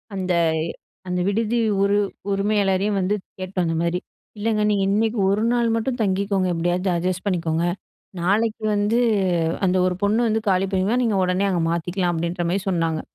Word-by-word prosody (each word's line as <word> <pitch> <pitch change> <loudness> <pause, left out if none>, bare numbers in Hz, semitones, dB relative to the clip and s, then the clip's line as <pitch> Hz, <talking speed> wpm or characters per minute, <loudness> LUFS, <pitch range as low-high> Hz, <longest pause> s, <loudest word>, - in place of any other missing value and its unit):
அந்த-அந்த 175 0 -2
விடுதி 225 +3 0 0.3
உரி 200 +1 +2 0.3
உரிமையாளரையும் 200 0 +1
வந்து 190 +3 +1 0.2
கேட்டோம் 185 -1 -2
அந்த 165 - -1
மாரி, 170 +1 0 0.4
"இல்லைங்க, 215 0 0
நீங்க 200 -1 +1
இன்னைக்கு 220 +2 +1
ஒரு 205 +3 +1
நாள் 235 -2 +1
மட்டும் 240 +2 -2
தங்கிக்கோங்க, 195 -1 0
எப்படியாவது 175 +3 0
அட்ஜஸ்ட் 185 +2 -2
பண்ணிக்கோங்க. 170 -2 0 0.6
நாளைக்கு 215 +4 +1
வந்து, 210 +4 +1 0.7
அந்த 185 0 +2
ஒரு 180 - -1
பொண்ண 210 +2 +2
வந்து 220 0 0
காலி 190 +1 +2
பண்ணிறுவா, 195 +6 +1
நீங்க 215 -4 +1
உடனே 180 +2 +1
அங்க 175 -2 0
மாத்திக்கலாம்" 175 +1 -1
அப்படின்ற 170 +1 -2
மாரி 195 +1 0
சொன்னாங்க. 165 -3 0
190 Hz, 150 wpm, -22 LUFS, 175-210 Hz, 0.7 s, உரி